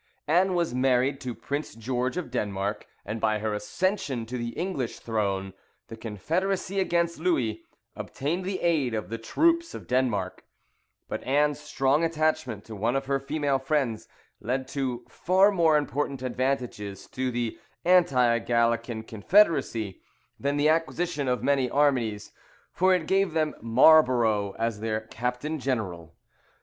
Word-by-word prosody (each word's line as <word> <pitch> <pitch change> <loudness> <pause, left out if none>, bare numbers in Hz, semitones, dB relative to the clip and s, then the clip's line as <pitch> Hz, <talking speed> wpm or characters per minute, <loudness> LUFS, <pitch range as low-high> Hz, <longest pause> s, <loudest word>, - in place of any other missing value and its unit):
Anne 180 +4 +3
was 170 -6 0
married 130 +2 +2
to 125 -3 -4
Prince 145 -2 -4
George 125 +5 -2
of 170 -9 -4
Denmark, 100 -3 -2 0.2
and 105 +2 -4
by 110 -1 +2
her 105 0 -2
accession 140 - -1
to 120 +3 -6
the 120 -1 -3
English 165 -10 -3
throne 100 -4 -2 0.4
the 115 - -7
confederacy 180 - -2
against 170 -3 0
Louis 125 -11 0 0.3
obtained 165 +7 -3
the 190 0 -3
aid 150 -9 +1
of 110 -1 -4
the 115 +1 -4
troops 335 - +1
of - - -8
Denmark; 115 -8 -1 0.6
but - - -4
Anne's 145 +2 +2
strong 135 +4 +1
attachment 155 -9 0
to 110 - -8
one 115 +5 0
of 135 0 -1
her 135 0 0
female 140 -1 0
friends 135 -5 -1 0.3
led 130 +3 -2
to 130 -4 -3
far 190 +3 +3
more 165 -5 +4
important 140 -2 -2
advantages 125 -6 -2
to 130 0 -2
the 120 -2 -3 0.3
anti 135 -10 +4
Gallican 115 -1 0
confederacy, 115 - +2 0.4
than 140 +1 0
the 145 +1 +3
acquisition 165 -2 0
of 125 -1 0
many 135 -2 +2
armies, 125 -7 +1 0.4
for 185 +1 +3
it 170 -3 -2
gave 195 -1 +1
them 155 -2 +1
MARLBOROUGH 115 -5 +4
as 115 -2 -1
their 110 0 -2
Captain 125 +7 -3
General. 95 -11 -3
130 Hz, 145 wpm, -27 LUFS, 115-155 Hz, 0.6 s, more